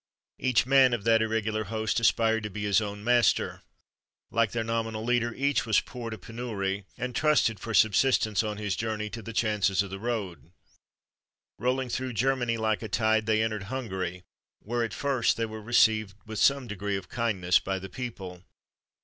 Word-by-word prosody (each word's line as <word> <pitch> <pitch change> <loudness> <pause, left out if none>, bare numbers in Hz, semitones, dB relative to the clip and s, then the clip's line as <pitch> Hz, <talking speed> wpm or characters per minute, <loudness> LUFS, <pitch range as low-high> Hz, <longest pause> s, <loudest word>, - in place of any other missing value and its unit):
Each 125 -3 +2
man 130 -1 +5
of 110 - -7
that 115 0 +4
irregular 110 -1 -1
host 110 +2 -1
aspired 115 -1 +2
to 105 - -4
be 105 +1 -6
his 100 -2 +3
own 105 -1 -5
master. 120 +1 +2 0.7
Like 115 -1 +2
their 115 +2 -2
nominal 115 -1 -2
leader, 120 -1 +1
each 140 -2 +1
was 110 - +4
poor 120 -2 -7
to 110 - -6
penury, 100 -3 -4
and 125 -1 -4
trusted 150 -8 +2
for 115 +2 -4
subsistence 110 -1 +3
on 105 -1 -3
his 105 -3 -2
journey 105 -1 -3
to 115 - -6
the 115 - -7
chances 105 -4 +1
of 100 - -9
the 95 - -6
road. 95 - -4 1.1
Rolling 130 +2 0
through 130 +1 -3
Germany 120 0 +1
like 110 -2 0
a 110 - -6
tide, 110 0 +1
they 110 0 +3
entered 110 -3 -2
Hungary, 95 -8 -4 0.4
where, 120 +2 -2
at 110 -3 -4
first, 135 -4 +1
they 115 - 0
were 110 0 -8
received 110 -2 +3
with 110 -1 -5
some 140 +5 +3
degree 100 -2 -3
of 95 - -8
kindness 95 -7 +1
by 95 0 -3
the 95 +1 -7
people. 95 -4 -7
110 Hz, 180 wpm, -28 LUFS, 105-120 Hz, 1.1 s, man